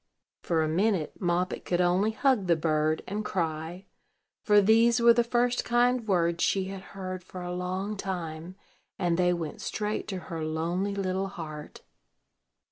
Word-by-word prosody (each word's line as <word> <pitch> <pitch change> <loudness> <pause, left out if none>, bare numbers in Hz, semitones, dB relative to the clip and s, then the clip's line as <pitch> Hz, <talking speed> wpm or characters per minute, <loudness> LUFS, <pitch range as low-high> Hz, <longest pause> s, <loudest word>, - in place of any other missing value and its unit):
For 165 -2 +1
a - - 0
minute, 180 0 +1
Moppet 180 0 0
could 175 - -1
only 180 +4 +3
hug 220 -3 +1
the 170 - +4
bird, 155 -1 0
and 210 +3 -3
cry; 170 -1 -3 0.6
for 210 -1 +5
these 225 +3 +4
were 235 0 +7
the 240 0 +3
first 240 +1 +1
kind 240 -1 +2
words 170 -3 +1
she 195 - +2
had 195 -1 -6 0.2
heard 185 -1 -5
for 180 0 -8
a 175 0 -4
long 185 +3 -3
time, 175 -3 -5 0.4
and 175 -1 +1
they 180 0 +3
went 165 -3 -4
straight 210 0 -3
to 195 - -3 0.2
her 160 -1 -3
lonely 170 +6 -1
little 190 0 -1
heart. 155 -5 -8
185 Hz, 160 wpm, -28 LUFS, 170-210 Hz, 0.6 s, were